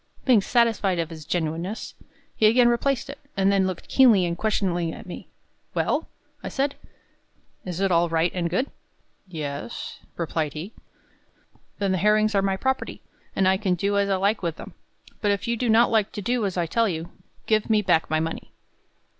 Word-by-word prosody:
Being 245 -6 +5
satisfied 225 -5 +2
of 165 0 -2
its 160 -2 -9
genuineness, 170 +5 -3 0.4
he 215 - +4
again 240 +2 +5
replaced 260 +3 0
it, 280 0 -8 0.2
and 195 0 +3
then 195 -1 +3
looked 185 -2 -5
keenly 230 -9 +5
and 170 0 -1
questioningly 175 -4 0
at - - -10
me. 180 - -8 0.5
"Well," - - 0 0.3
I - - -5
said, 280 +1 0 0.9
"is 180 -1 -4
it 195 -1 +1
all 170 0 +3
right 165 +1 +1
and 175 -2 -1
good?" 250 +11 -1 0.6
"Yes," 145 -8 -6 0.2
replied 160 -3 -2
he. 175 +8 -7 1.0
"Then 200 -2 0
the 185 - +1
herrings 215 +2 +3
are 200 - +3
my 195 -1 0
property, 265 +5 -2 0.3
and 190 - +3
I 190 0 +4
can 190 -3 0
do 200 +4 0
as 200 0 +1
I 195 - +3
like 200 +3 +1
with 170 -3 -2
them; - - -10 0.5
but 210 - +1
if 200 0 0
you 235 - +1
do 240 +1 -1
not 230 +2 +5
like 215 -3 +2
to 205 - -5
do 235 0 +1
as 185 - -5
I 175 - +1
tell 230 +6 +1
you, 165 0 -5 0.3
give 215 0 +1
me 215 -1 +3
back 175 -4 +2
my 155 +1 +1
money." 160 +1 -4
195 Hz, 190 wpm, -25 LUFS, 170-220 Hz, 1.0 s, Being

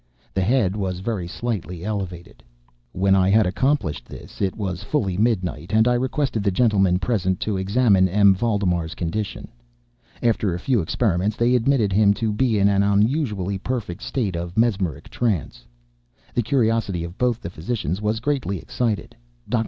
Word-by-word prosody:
The 95 - 0
head 105 -2 +2
was 95 -3 -2
very 95 -3 -3
slightly 90 -4 -4
elevated. 95 -5 -5 0.5
When 95 +1 +2
I 95 -1 +4
had 110 +1 +4
accomplished 130 - 0
this, - - -11
it 95 -2 0
was 95 -4 -3
fully 105 -5 -1
midnight, 95 -5 -1
and 110 +2 +4
I 125 - +4
requested 130 -1 -1
the 100 - +1
gentlemen 95 -3 +3
present 95 -3 0
to 105 - -1
examine 95 -1 +3
M. 100 +1 +5
Valdemar's 90 -5 0
condition. 95 +5 -4 0.7
After 110 -6 +1
a - - -5
few 120 +2 +1
experiments, 100 +3 0
they 120 +2 +2
admitted 120 -4 +2
him 100 0 +4
to 110 -1 -1
be 115 0 +1
an 100 0 +4
unusually 100 - +1
perfect 110 -4 -4
state 120 -7 -2
of 85 +2 -5
mesmeric 100 - 0
trance. 100 - -2 0.7
The 120 - +1
curiosity 115 - 0
of 85 +2 -8
both 125 -2 +1
the 85 - -7
physicians 90 - -3
was 110 +1 0
greatly 130 -6 -1
excited. 110 +6 -3 0.3
Dr. 120 - +1
100 Hz, 160 wpm, -22 LUFS, 95-115 Hz, 0.7 s, M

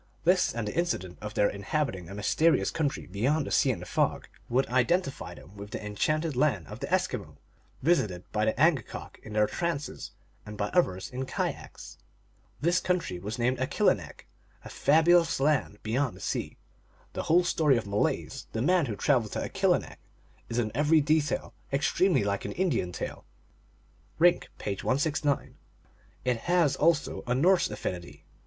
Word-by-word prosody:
This 180 +2 +3
and 115 -2 -3
the - - -3
incident 150 - -2
of 105 0 -6
their 105 - +4
in 100 - -5
habiting 100 - -2
a 100 - -7
mysterious 155 +10 +2
country 150 -3 -2
beyond 130 +11 0
the - - -6
sea - - +3
and - - -2
the - - -8
fog - - 0 0.2
would 130 +3 +2
identify 135 +6 0
them 85 +9 -15
with 100 0 -9
the 105 - -6
enchanted 155 +9 -1
land 125 - +1
of - - -8
the - - -4
Eskimo, - - -1 0.5
visited 110 - +1
by 105 0 +1
the 110 +2 0
Angakok 155 -6 0
in 110 - -10
their 105 0 +4
trances, 150 0 -3 0.3
and 105 0 -9
by 105 0 -1
others 95 - 0
in 130 +1 -4
kayaks. - - -5 0.6
This 175 +3 +2
country 180 - -1
was 105 +6 -5
named 125 +1 +1
Alcilinelc, 130 - 0 0.2
" - - -30
a - - -8
fabulous 165 +2 +4
land 140 -7 +1
beyond 125 +3 0
the - - -13
sea." - - -3 0.6
The - - -2
whole 175 +3 +5
story 155 -6 +3
of 115 - -3
Malaise, 100 +1 -1
the 110 - -1
man 175 0 +3
who 110 - -3
traveled 120 -3 +1
to - - -2
Akilinek, - - 0 0.5
is 115 - -3
in 110 -3 0
every 150 +4 +4
detail 155 0 0 0.2
extremely 150 - +2
like 100 0 -1
an - - -4
Indian 155 - 0
tale. - - -6 0.9
(Rink, 175 +2 +4
page 100 -2 -4
169.) 145 +1 0 0.7
It 125 -2 +2
has 170 -2 +2
also 160 -1 +1
a 125 - +1
Norse 180 +7 +3
affinity. 90 -4 -6
135 Hz, 170 wpm, -28 LUFS, 105-160 Hz, 0.9 s, whole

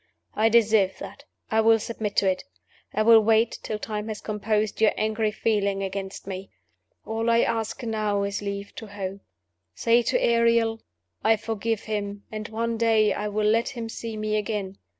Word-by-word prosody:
I 220 +1 +3
deserve 220 -4 +3
that - - -10 0.3
I 220 0 +4
will 225 0 +5
submit 215 -2 -4
to 195 - +3
it; 185 -1 0 0.5
I 215 - +1
will 225 0 +8
wait 225 +1 +2
till 215 - -3
time 210 0 -4
has 215 -2 -4
composed 215 0 -1
your 220 - +5
angry 215 0 0
feeling 200 -2 0
against 195 0 -5
me. 190 0 -6 0.6
All 225 +1 -1
I 230 0 +4
ask 225 +2 -2
now 215 -3 0
is 200 +1 -2
leave 200 0 -5
to 220 - -7
hope. 195 -1 -6 0.5
Say 235 +1 +3
to 235 - +1
Ariel, 230 -1 +2 0.4
'I 225 - +5
forgive 225 0 -2
him; 205 -1 -4
and 215 -1 -5
one 230 +1 -2
day 220 -2 +3
I 210 - -3
will 210 +1 -1
let 230 +2 +2
him 235 -4 -6
see 225 -1 -6
me 215 0 -1
again. 205 -2 -3
215 Hz, 175 wpm, -25 LUFS, 205-225 Hz, 0.6 s, will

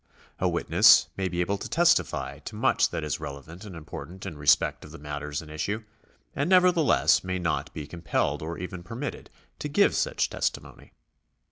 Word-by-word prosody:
A - - +2
witness - - +5
may 95 -1 -1
be 90 0 -1
able 100 +3 -1
to - - -6
testify 170 +1 +2
to - - -9
much - - +2
that 80 - -4
is 75 - -2
relevant 80 +7 -8
and 95 -4 -9
important 85 +4 -9
in 90 -5 -6
respect 75 0 +2
of - - -11
the 80 - -10
matters 75 0 -5
in 75 - -13
issue, 100 +8 -3 0.5
and 145 +4 0
nevertheless 180 -4 +4
may 95 0 -2
not 85 -3 -2
be 75 - -6
compelled 75 -2 -2
or 80 +2 -5
even 90 0 -6
permitted 115 +10 -6 0.3
to 150 - -4
give 200 +8 +3
such - - 0
testimony. - - -4
90 Hz, 175 wpm, -27 LUFS, 75-115 Hz, 0.5 s, witness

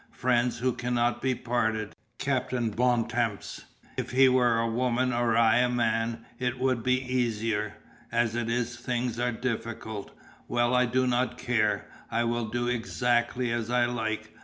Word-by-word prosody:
Friends 125 -1 +1
who 125 +1 0
cannot 120 0 0
be 130 -1 +1
parted, 110 -3 -1 0.2
Captain 125 -4 -1
Bontemps. 120 -2 0 0.3
If - - -2
he 130 +2 +5
were 125 -2 +4
a 115 0 +1
woman 125 +2 +1
or 120 -1 +2
I 115 -1 +5
a 125 0 +3
man 115 -1 0
it 125 -1 -1
would 130 -2 +1
be 125 +2 +2
easier. 115 -5 -1 0.4
As 115 -1 +1
it 120 -1 -2
is 120 0 -1
things 120 -1 -2
are 125 0 +1
difficult. 115 -3 -4 0.4
Well, 120 +1 +1
I 125 0 +4
do 130 +2 +1
not 125 0 0
care. 105 -4 +1 0.2
I 115 +1 +1
will 120 0 0
do 120 +2 -2
exactly 120 0 0
as 120 -1 -2
I 120 0 +3
like. 110 -3 -3
120 Hz, 160 wpm, -28 LUFS, 115-125 Hz, 0.4 s, he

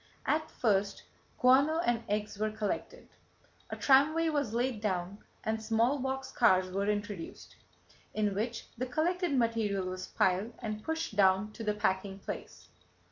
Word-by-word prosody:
At 310 +1 0
first 200 -3 0 0.3
guano 275 +5 +5
and 240 -8 0
eggs 210 0 -2
were 215 0 +1
collected. 215 -1 -4 0.6
A - - -4
tramway 310 +4 +4
was 285 -7 0
laid 240 -1 -1
down 190 -1 -2 0.2
and 220 0 -1
small 230 +5 +2
box 265 +1 -3
cars 185 -5 +3
were 200 +2 0
introduced, 205 -4 -4 0.6
in 210 -2 0
which 225 +4 -3
the 255 - -1
collected 335 +3 0
material 225 -5 +1
was 185 0 -5
piled 190 +5 +1
and 215 -2 -5
pushed 320 -9 -3
down 195 +1 +3
to 225 - -8
the 210 -1 0
packing 195 -2 -1
place. - - -8
215 Hz, 145 wpm, -31 LUFS, 200-260 Hz, 0.6 s, guano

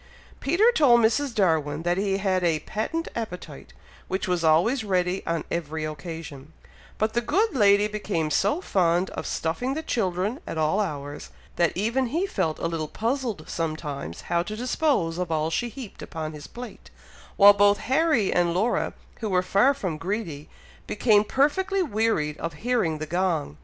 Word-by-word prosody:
Peter 380 - +4
told 265 - +5
Mrs. 235 +4 +1
Darwin 160 -6 +1
that 175 0 +1
he 195 -1 0
had 190 -2 0
"a 165 -3 +1
patent 325 +10 -3
appetite," 180 - -6 0.4
which 190 +1 -2
was 180 -2 0
always 175 - +3
ready 185 -2 0
on 165 -1 -1
every 160 -2 -3
occasion; 155 -2 -8 0.4
but 215 +1 0
the 240 - +1
good 405 - +1
lady 205 -3 +5
became 205 -7 -2
so 210 - +1
fond 180 - +1
of - - -5
stuffing 245 +12 -2
the 315 - -3
children 205 - -1
at - - -4
all 155 +6 +1
hours, 145 -7 -4 0.3
that 170 -1 +2
even 230 +7 0
he 330 +10 0
felt 185 - -1
a - - -4
little 165 -2 -2
puzzled 230 - -2
sometimes 155 - -4
how 170 0 0
to 210 +5 -5
dispose 240 - 0
of 180 -2 -2
all 155 0 0
she 240 +8 -1
heaped 240 -3 -10
upon 160 -1 -5
his 150 -1 -9
plate, 245 0 -10 0.5
while 205 0 +9
both 205 0 +4
Harry 275 -5 +2
and 175 -1 +2
Laura, 220 +6 0 0.3
who 220 - -3
were 180 -1 +2
far 200 +8 +4
from 185 - -4
greedy, 165 -5 -4 0.4
became 210 -1 +3
perfectly 365 - +1
wearied 215 - 0
of 165 0 -4
hearing 225 -11 +1
the 155 - -4
gong. 165 - -1
190 Hz, 170 wpm, -25 LUFS, 165-235 Hz, 0.5 s, while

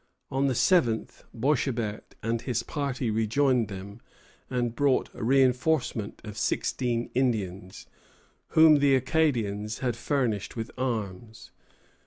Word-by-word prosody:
On 135 +1 +1
the 130 - 0
7th, 120 -9 +1
Boishébert 120 -5 0 0.2
and 115 +1 -1
his 120 -3 -2
party 135 -5 -2
rejoined 115 +2 +2
them, 100 +2 -8 0.5
and 120 -2 -1
brought 140 0 +1
a 125 - -7
reinforcement 130 -2 +1
of 105 0 -7
sixteen 120 +1 -1
Indians, 100 -8 -2 0.7
whom 160 -2 +8
the 140 -1 +4
Acadians 120 -7 0
had 125 -3 -1
furnished 120 -6 -1
with 115 -1 -5
arms. 110 -3 -4
120 Hz, 115 wpm, -27 LUFS, 110-135 Hz, 0.7 s, whom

